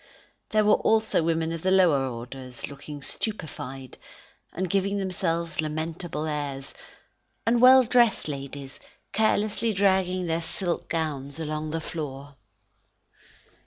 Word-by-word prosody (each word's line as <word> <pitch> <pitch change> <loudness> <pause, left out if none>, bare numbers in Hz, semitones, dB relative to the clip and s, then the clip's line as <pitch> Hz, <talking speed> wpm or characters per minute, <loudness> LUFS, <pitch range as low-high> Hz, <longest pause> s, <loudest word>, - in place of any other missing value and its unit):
There 215 -1 +3
were 210 - +6
also 220 -4 +3
women 165 0 0
of 165 -1 -4
the 185 - +1
lower 170 -8 +4
orders 125 +1 -7
looking 145 0 -9
stupefied, 135 - -4 0.5
and 185 +2 -2
giving 195 +2 +1
themselves 170 -4 -1
lamentable 155 +1 -3
airs; 145 -3 -4 0.7
and 235 +1 +3
well 260 +1 +9
dressed 235 -5 +3
ladies, 140 -1 -6 0.3
carelessly 215 +1 +1
dragging 190 -2 +2
their 165 0 0
silk 175 +1 -3
gowns 150 -3 -2
along 155 0 -3
the 165 +1 -2
floor. 145 -3 -6
165 Hz, 120 wpm, -26 LUFS, 145-195 Hz, 0.7 s, well